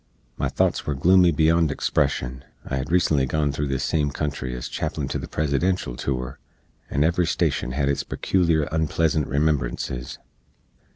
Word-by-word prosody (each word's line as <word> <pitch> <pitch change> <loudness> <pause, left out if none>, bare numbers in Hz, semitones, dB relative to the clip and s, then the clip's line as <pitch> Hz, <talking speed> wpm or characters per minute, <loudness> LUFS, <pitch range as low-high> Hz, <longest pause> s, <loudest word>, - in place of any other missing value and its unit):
My - - -1
thots - - 0
were 75 - 0
gloomy 90 +5 +5
beyond 80 +1 +3
expression. 65 -3 -1 0.2
I 65 - -2
hed 65 +4 -4
recently 80 -6 +3
gone 75 0 0
through 70 +1 -2
this 70 0 -1
same 75 -1 +1
country 70 -3 -3
ez - - -5
chaplin - - -3
to - - -2
the - - -6
Presidential 75 -1 0
tour, 65 -1 -3 0.5
and 70 +2 +1
every 85 +1 +2
stashen 60 - 0
hed 70 +1 0
its 70 - 0
pecooliar 85 -5 +1
onpleasant 80 -1 +1
remembrances. 70 -4 -1
75 Hz, 155 wpm, -24 LUFS, 65-80 Hz, 0.5 s, gloomy